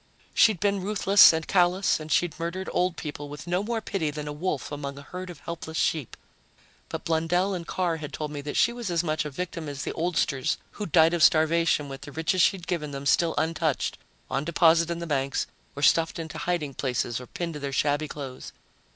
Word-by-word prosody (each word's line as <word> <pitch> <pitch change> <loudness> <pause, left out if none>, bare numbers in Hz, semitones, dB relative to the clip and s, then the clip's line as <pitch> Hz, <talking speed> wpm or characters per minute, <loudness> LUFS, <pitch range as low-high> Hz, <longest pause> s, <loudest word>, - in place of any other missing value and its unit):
She'd 215 -6 +5
been 200 +1 +1
ruthless 200 0 +6
and 160 -1 -3
callous, 180 0 +3
and 155 0 -8
she'd 175 -1 +1
murdered 170 +3 -3
old 180 -1 +1
people 145 -1 -6
with 150 +2 -8
no 180 +2 0
more 225 +2 -2
pity 175 -7 -2
than 150 0 -5
a 145 - -4
wolf 150 -2 -3
among 140 -1 -5
a 140 - -9
herd 180 +4 -7
of 175 - -10
helpless 160 -1 -6
sheep. 155 -7 -1 0.7
But - - -5
Blundell 170 +4 +1
and 175 -2 -5
Carr 175 -3 -1
had 150 -2 -7
told 150 -1 -4
me 145 -1 -5
that 145 +1 -4
she 235 - +4
was 240 -4 -5
as 170 -1 +1
much 155 -1 -1
a - - -3
victim 165 +1 -5
as 145 0 -5
the - - -3
oldsters 165 -4 0
who'd 205 -6 -6
died 160 +1 +5
of 170 - 0
starvation 160 -1 +4
with 135 0 -8
the 145 - -9
riches 160 +4 +1
she'd 190 -2 +2
given 160 -5 -2
them 140 0 -6
still 165 +3 +3
untouched, 160 -2 0 0.3
on 135 +2 -1
deposit 170 0 +4
in 170 - -2
the 170 - -5
banks 140 -3 0 0.3
or 145 - -5
stuffed 165 +2 +4
into 160 -1 -6
hiding 170 -6 -1
places 125 -2 -2
or 125 - -10
pinned 170 +4 -4
to 150 - -6
their 140 -1 -4
shabby 145 +2 +1
clothes. 135 -4 -8
160 Hz, 215 wpm, -26 LUFS, 145-175 Hz, 0.7 s, ruthless